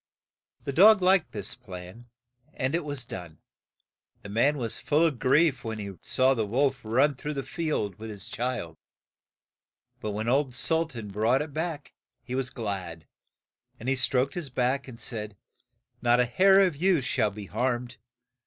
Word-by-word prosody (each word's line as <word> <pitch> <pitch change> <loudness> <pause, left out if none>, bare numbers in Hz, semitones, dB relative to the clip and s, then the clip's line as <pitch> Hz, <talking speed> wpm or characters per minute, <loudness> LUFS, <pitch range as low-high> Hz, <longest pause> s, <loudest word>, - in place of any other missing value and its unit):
The 140 - -3
dog 205 +4 +7
liked 185 -2 +3
this 105 -2 -4
plan, 90 +5 -10 0.5
and 130 +2 -1
it 170 0 0
was 145 -4 -4
done. 85 -7 -8 0.9
The 100 - -8
man 130 +8 +2
was 115 -4 -3
full 155 +3 +2
of 145 -7 0
grief 135 0 +3
when 110 -1 -4
he 100 -2 -6
saw 130 +1 +3
the 115 -4 0
wolf 135 +4 +1
run 130 +7 +3
through 150 +3 -5
the 135 - -2
field 140 - -2
with 110 0 -7
his 105 -2 -6
child; 115 -10 -3 1.2
but 110 - -4
when 105 +2 -3
old 135 0 +1
Sul 160 +5 +2
tan 115 -8 -8
brought 115 +7 +2
it 150 -2 -10
back, 155 -2 -4 0.3
he 125 - -7
was 130 0 -1
glad, 95 - -5 0.7
and 115 - -8
he 135 - +2
stroked 130 +1 +1
his 170 -6 -5
back, 130 +2 0
and 120 -3 -10
said, 105 -4 -5 0.6
"Not 120 0 +4
a 125 - +4
hair 190 +10 +5
of 180 -5 -1
you 175 0 +2
shall 110 -3 +1
be 105 0 -8
harmed. 120 +3 -2
125 Hz, 170 wpm, -27 LUFS, 110-145 Hz, 1.2 s, dog